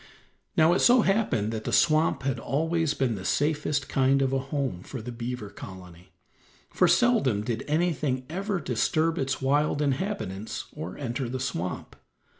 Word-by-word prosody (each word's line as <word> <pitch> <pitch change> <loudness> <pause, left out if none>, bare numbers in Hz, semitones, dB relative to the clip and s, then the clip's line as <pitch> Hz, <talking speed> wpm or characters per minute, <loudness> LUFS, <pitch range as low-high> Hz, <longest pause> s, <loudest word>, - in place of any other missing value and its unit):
Now 160 +2 +6
it 185 - +2
so 245 -1 +6
happened 195 - +1
that 110 -1 -4
the - - -3
swamp 155 -3 +3
had 135 -3 -1
always 160 +4 0
been 130 -4 0
the 95 -3 -6
safest 145 +2 0
kind 135 +1 +3
of 135 0 0
a 135 - +2
home 135 -8 -3
for 130 - -7
the 120 +2 -6
Beaver 120 -3 -5
Colony, 90 -3 -11 0.6
for - - +3
seldom 210 - +3
did 115 0 -3
anything 150 -5 0
ever 195 +4 -2
disturb 155 +5 0
its 135 0 -2
wild 145 +2 +2
inhabitants 140 - -2
or 85 +3 -7
enter 120 -2 -3
the 130 +1 -3
swamp. 110 -9 -4
135 Hz, 160 wpm, -27 LUFS, 115-155 Hz, 0.6 s, Now